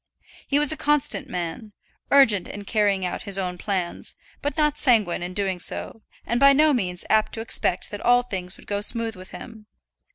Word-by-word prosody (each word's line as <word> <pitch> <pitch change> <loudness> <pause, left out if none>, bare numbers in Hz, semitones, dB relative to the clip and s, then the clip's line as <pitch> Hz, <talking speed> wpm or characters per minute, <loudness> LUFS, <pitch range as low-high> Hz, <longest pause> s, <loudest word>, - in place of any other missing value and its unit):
He 280 - +1
was 295 0 +3
a 315 - -3
constant 285 -2 0
man; 180 +3 -5 0.4
urgent 225 -9 +4
in 205 0 -8
carrying 200 -3 +1
out 180 - -4
his 200 -2 0
own 180 -2 -4
plans, 185 -4 -3 0.3
but 290 +1 -3
not 300 -1 +1
sanguine 220 - +2
in 180 +1 -6
doing 195 -3 -2
so, 225 - -1 0.2
and 235 +1 -1
by 275 +1 +7
no 305 +2 +4
means 180 -8 -3
apt 215 0 +2
to 225 - -4
expect 205 -5 +2
that 205 - -6
all 245 0 +4
things 185 -6 -6
would - - -17
go 205 0 -3
smooth 225 +1 0
with 185 0 -12
him. 220 -2 -11
215 Hz, 195 wpm, -23 LUFS, 185-255 Hz, 0.4 s, by